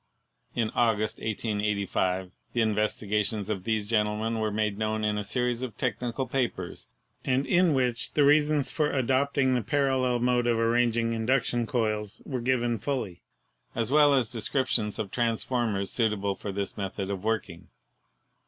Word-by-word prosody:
In 115 -3 0
August, 110 -2 +1
1885, 100 -4 -1 0.2
the 120 - +1
investigations 105 -1 0
of 95 -3 -4
these 110 -2 0
gentlemen 110 +1 0
were 110 -1 0
made 105 -1 -1
known 110 0 -1
in 105 0 +1
a 105 - -2
series 125 +3 -1
of 130 -4 -5
technical 125 +1 -2
papers, 120 -8 -3 0.4
and 130 +2 +1
in 175 -4 +3
which 125 -3 0
the 150 - +4
reasons 150 -1 +3
for 150 -2 +1
adopting 135 +1 +1
the 125 - +1
parallel 130 0 +1
mode 120 0 +1
of 120 -1 +2
ar 115 0 +2
ranging 115 -1 +2
induction 120 0 0
coils 110 -4 -1
were 130 -3 -3
given 120 -2 +1
fully, 125 -11 -3 0.5
as 115 +2 -1
well 145 -1 +6
as 125 -5 +1
de 115 - -3
scriptions 115 -4 +1
of 105 -3 -4
transformers 115 -4 -1
suitable 105 -4 0
for 100 +1 -6
this 100 0 -4
method 100 0 -3
of 95 -1 -4
working. 105 -6 -2
115 Hz, 155 wpm, -27 LUFS, 105-125 Hz, 0.5 s, well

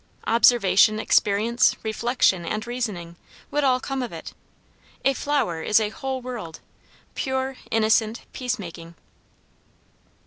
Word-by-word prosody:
Observation, 215 -3 +4
experience, 225 +4 +2
reflection, 220 -4 +1
and 215 +6 -3
reasoning, 210 -9 -4 0.3
would 295 0 0
all 255 -2 +3
come 270 0 -3
of 245 - -4
it. - - -8 0.7
A 275 - +4
flower 265 - -1
is 210 +6 +3
a 215 -1 -1
whole 265 +3 -5
world, 225 -11 -7 0.5
pure, 265 0 -2
innocent, 220 0 +2
peacemaking. 175 -10 -5
230 Hz, 110 wpm, -24 LUFS, 200-255 Hz, 0.7 s, Observation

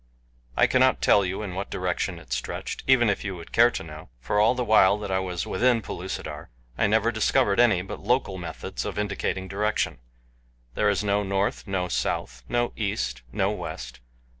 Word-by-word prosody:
I - - +6
cannot - - +3
tell 100 - +5
you 95 +3 -3
in 95 -3 -5
what 95 +2 -4
direction - - -2
it - - -7
stretched - - -4
even 130 -3 +5
if 100 - 0
you 95 -2 -4
would 85 -2 -11
care 120 +1 +6
to - - -5
know, 75 -2 -10
for 105 +12 0
all 110 +4 +4
the 125 -1 -1
while 105 -2 +5
that 105 -2 -5
I 95 - +2
was 90 -3 -3
within 120 -2 +2
Pellucidar 95 0 -6 0.3
I 105 - +2
never 110 +2 +2
discovered 105 -2 +2
any 110 -7 +4
but 95 - -7
local 105 -4 0
methods 85 - -5
of - - -5
indicating 100 -2 -2
direction 105 - -1 0.7
there - - +2
is - - 0
no 100 0 +1
north, 100 +2 -1
no 95 -2 -1
south, 65 -6 -2
no 120 0 0
east, 100 - -2
no - - +1
west. 60 0 -6
100 Hz, 190 wpm, -26 LUFS, 90-110 Hz, 0.7 s, I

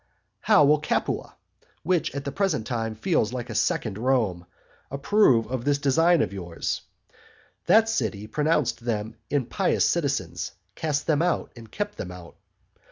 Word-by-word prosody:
How 150 - +5
will 150 +1 +4
Capua, 155 - -2 0.5
which 175 -4 0
at 140 0 -4
the 140 - -2
present 185 - 0
time 115 -2 -3
feels 125 - 0
like 125 -1 -5
a - - -4
second 105 -3 0
Rome, 110 -9 0 0.4
approve 140 - +3
of 125 0 -4
this 145 +1 +2
design 165 +4 +3
of - - -4
yours? 85 -4 -4 0.9
That 225 +1 +6
city 105 - -2
pronounced 150 +4 0
them 110 -2 -2
impious 140 -4 +1
citizens, - - -1 0.2
cast 150 -2 -2
them 155 -1 +2
out, 175 0 0
and 115 -2 -13
kept 205 0 -4
them 90 - -4
out. 90 -2 -11
135 Hz, 150 wpm, -25 LUFS, 110-155 Hz, 0.9 s, That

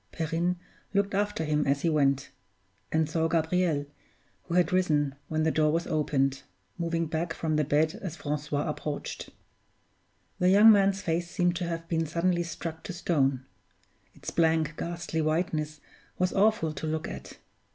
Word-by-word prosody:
Perrine 165 +2 -1 0.4
looked 200 0 +2
after 205 -4 0
him 150 -1 +1
as 140 +1 +1
he 170 - +3
went; 140 -3 +2 0.6
and 160 -1 +2
saw 160 +1 0
Gabriel, 165 -2 +1 0.6
who 170 - -3
had 180 -1 +3
risen 150 -6 +2
when 155 0 0
the 160 - +2
door 155 -1 +3
was 165 +2 0
opened, 140 -3 0 0.3
moving 165 0 -1
back 160 +1 -2
from 155 -2 -1
the 150 - +2
bed 150 +2 +2
as 180 -5 -5
Francois 145 -2 -2
approached. 150 -1 -4 1.1
The 180 - +4
young 210 +4 +8
man's 195 -1 +3
face 170 +1 -1
seemed 175 -1 +1
to 175 - -2
have 165 -1 -4
been 165 -1 0
suddenly 175 +2 +1
struck 165 -1 -5
to 185 - -5
stone 135 -7 0 0.7
its - - -6
blank, 160 -2 +2
ghastly 170 -1 -3
whiteness 155 -1 -1 0.4
was 185 0 +1
awful 200 -6 +2
to 155 +2 -5
look 155 0 -2
at. - - -8
160 Hz, 160 wpm, -28 LUFS, 150-175 Hz, 1.1 s, young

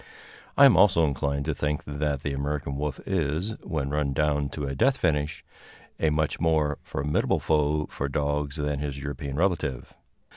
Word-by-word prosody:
I 140 - +9
am 135 - +7
also 90 -5 +5
inclined 70 0 -1
to 80 - 0
think 75 +1 -2
that 70 -1 -2
the 70 - -2
American 70 0 -2
wolf 75 0 -3
is, 85 +1 -1
when 75 -6 -3
run 75 -2 0
down 75 0 +1
to 75 0 -4
a 70 - -3
death 135 - +2
finish, 80 0 -1 0.5
a 80 - +3
much 75 0 0
more 80 -3 +1
formidable 75 +2 0
foe 75 0 +1
for 70 - -4
dogs 75 +1 -1
than 75 -2 -1
his 70 -2 -3
European 70 0 -5
relative. 80 -7 -1
75 Hz, 170 wpm, -26 LUFS, 70-80 Hz, 0.5 s, I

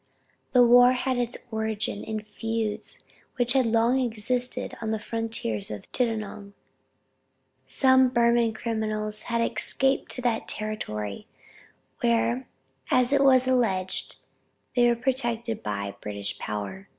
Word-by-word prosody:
The 250 -1 +7
war 245 +1 +7
had 255 0 -1
its 245 0 -2
origin 220 -2 -2
in 220 -1 -4
feuds 220 0 -4 0.3
which 245 -1 +2
had 260 -3 +3
long 230 +3 +3
existed 245 +1 -1
on 220 - -2
the 220 - 0
frontiers 220 - -3
of 105 -1 -8
Chittagong." 215 -4 -2 1.1
Some 260 -1 +4
Burman 235 -2 +3
criminals 215 -2 -2
had 235 0 +1
escaped 265 +4 0
to 250 - -5
that 235 -2 0
territory, 105 - -4 0.7
where 115 +2 +1 0.4
as 255 +1 +3
it 280 0 +4
was 260 -1 +5
alleged 200 -8 0 0.6
they 240 -1 +5
were 235 - +3
protected 235 -3 -1
by 100 -1 -3
British 100 -1 -4
power. 105 - -5
225 Hz, 125 wpm, -26 LUFS, 210-245 Hz, 1.1 s, The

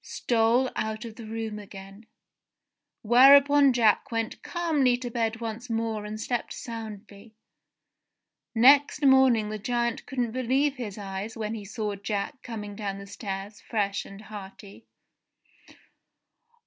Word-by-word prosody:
stole 235 +2 +1
out 220 +1 -3
of 225 -2 -9
the 230 -2 -10
room 220 -1 -5
again; 195 +1 -12 1.0
whereupon 280 +4 +7
Jack 230 -4 +2
went 225 -1 -3
calmly 300 -8 +1
to 245 -1 -6
bed 230 -1 -1
once 230 +1 -6
more 225 -2 -2
and 215 +1 -6
slept 240 +1 -3
soundly! 215 -2 -9 1.2
Next 280 +5 +5
morning 260 -5 +5
the 215 - -4
giant 235 +2 -2
couldn't 245 -4 -2
believe 265 +3 0
his 220 -5 -6
eyes 200 +2 -6
when 215 0 -3
he 215 -3 -6
saw 210 0 -3
Jack 205 +6 -4
coming 210 -4 -7
down 200 -2 -4
the 200 - -9
stairs 200 0 -7
fresh 200 -3 -2
and 195 +1 -12
hearty. 205 0 -11
225 Hz, 130 wpm, -27 LUFS, 210-245 Hz, 1.2 s, whereupon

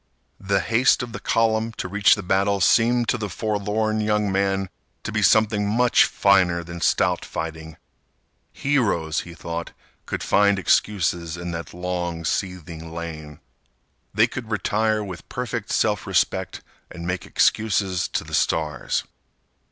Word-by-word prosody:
The 100 0 0
haste 120 +5 +3
of 120 - -7
the - - -6
column 115 0 +1
to 95 - -5
reach 100 +2 +4
the 105 - -6
battle 100 +2 +1
seemed 115 +6 +3
to 120 - +1
the 105 -2 -3
forlorn 110 +2 -1
young 105 -1 +1
man 95 0 0 0.3
to - - -4
be - - 0
something 105 -2 +3
much 120 +3 +4
finer 90 -4 +3
than 85 0 -8
stout - - +2
fighting. 80 -1 -6 0.7
Heroes, 100 - 0
he 85 -1 -8
thought, 85 0 -6 0.3
could - - -3
find 100 0 +3
excuses 90 -2 +1
in 85 0 -5
that 85 0 -6
long 90 -2 -4
seething 85 -3 -4
lane. 80 -3 -7 0.7
They - - +4
could 120 -4 -7
retire 110 +1 0
with 90 -5 -9
perfect 120 -3 -4
self 105 -3 0
respect - - 0 0.3
and 85 -1 -8
make 90 +1 -3
excuses 95 -4 +1
to - - -3
the - - -12
stars. 75 -4 0
95 Hz, 145 wpm, -23 LUFS, 85-110 Hz, 0.7 s, reach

